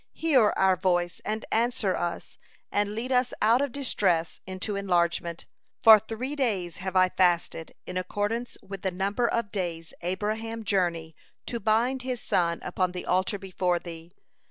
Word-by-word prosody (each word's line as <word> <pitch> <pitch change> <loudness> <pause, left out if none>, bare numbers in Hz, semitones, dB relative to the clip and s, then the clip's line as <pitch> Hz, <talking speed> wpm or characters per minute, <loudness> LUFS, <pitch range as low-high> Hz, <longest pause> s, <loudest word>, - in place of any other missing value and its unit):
Hear 270 -10 +4
our 190 -1 +4
voice 175 -2 0
and 215 +1 -3
answer 230 -3 +1
us, 175 0 -4 0.3
and 205 0 0
lead 245 +4 -3
us 250 -1 +2
out 230 +4 +4
of 285 -2 -1
distress 190 -11 0
into 190 +2 -4
enlargement. 170 -3 0 0.4
For 220 -1 +10
three 230 +7 -5
days 200 - -1
have 190 +1 -5
I 185 0 +5
fasted 175 -3 +1
in 180 - -5
accordance 205 +6 -2
with 195 -1 -8
the 190 - 0
number 200 +6 0
of 230 -4 -1
days 170 -5 -4
Abraham 215 +5 -3
journey 170 -5 0 0.3
to 235 - -3
bind 230 +5 +1
his 250 -1 -3
son 170 -4 0
upon 185 -1 -1
the 180 - -5
altar 185 +3 +1
before 185 -2 -1
Thee. 170 -1 -9
195 Hz, 155 wpm, -27 LUFS, 180-225 Hz, 0.4 s, For